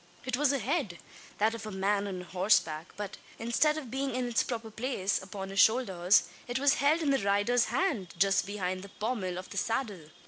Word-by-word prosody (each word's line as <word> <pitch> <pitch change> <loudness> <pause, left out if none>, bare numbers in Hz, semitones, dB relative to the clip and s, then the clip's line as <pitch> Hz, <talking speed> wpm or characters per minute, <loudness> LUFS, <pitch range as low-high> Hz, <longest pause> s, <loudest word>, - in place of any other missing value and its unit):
It 255 -1 0
was 285 +1 +3
a 280 - +1
head 255 - -1 0.4
that 220 +2 +2
of 230 - -6
the 215 - -6
man 200 +1 0
on 185 -2 -4
horseback; 180 -3 +1
but, 205 -1 -5 0.2
instead 270 +7 +2
of 265 -7 -7
being 270 -1 -2
in 255 -1 -1
its 240 - +2
proper 225 -2 -4
place, 220 -4 -1
upon 195 0 -7
his 195 - -2
shoulders, 195 -6 +4 0.2
it 245 +1 -1
was 280 +1 +4
held 305 +4 +3
in 285 - +2
the 270 - +3
rider's 205 +5 +2
hand, 235 - -1
just 195 +2 +3
behind 185 -2 -3
the 200 - -10
pommel 205 -5 -3
of 185 - -8
the 200 - -6
saddle! 225 -4 -1
215 Hz, 205 wpm, -30 LUFS, 195-255 Hz, 0.4 s, shoulders